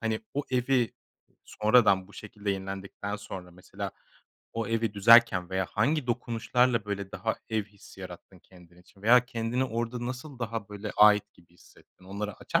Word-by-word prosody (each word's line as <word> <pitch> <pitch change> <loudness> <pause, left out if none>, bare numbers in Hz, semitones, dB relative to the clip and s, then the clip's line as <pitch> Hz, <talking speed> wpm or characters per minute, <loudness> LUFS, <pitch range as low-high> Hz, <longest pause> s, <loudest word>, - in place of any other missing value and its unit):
hani, 110 -1 -1
o 145 - 0
evi 125 -1 +1 0.5
sonradan 105 -4 +3
bu - - -17
şekilde 105 -1 -5
yenilendikten 95 +1 -5
sonra 95 -3 -9
mesela 90 +1 -7 0.6
o 115 -2 -2
evi 115 -2 0
düzerken 110 -4 +6
veya 95 -1 0
hangi 150 -3 +1
dokunuşlarla, 120 0 +1
böyle, 100 -1 -5
daha - - -2
ev 110 -2 0
hissi 100 -1 -16
yarattın - - -10
kendin 90 -1 -19
için 95 +2 -22
veya 125 +3 +6
kendini 120 +1 -1
orada 120 0 -3
nasıl 130 +1 -7
daha, 115 -3 -4
böyle, 105 +1 -6
ait 105 -1 +6
gibi 85 0 -24
hissettin, 90 - -22
onları 100 +1 -5
açar - - 0
110 Hz, 155 wpm, -28 LUFS, 100-120 Hz, 0.6 s, düzerken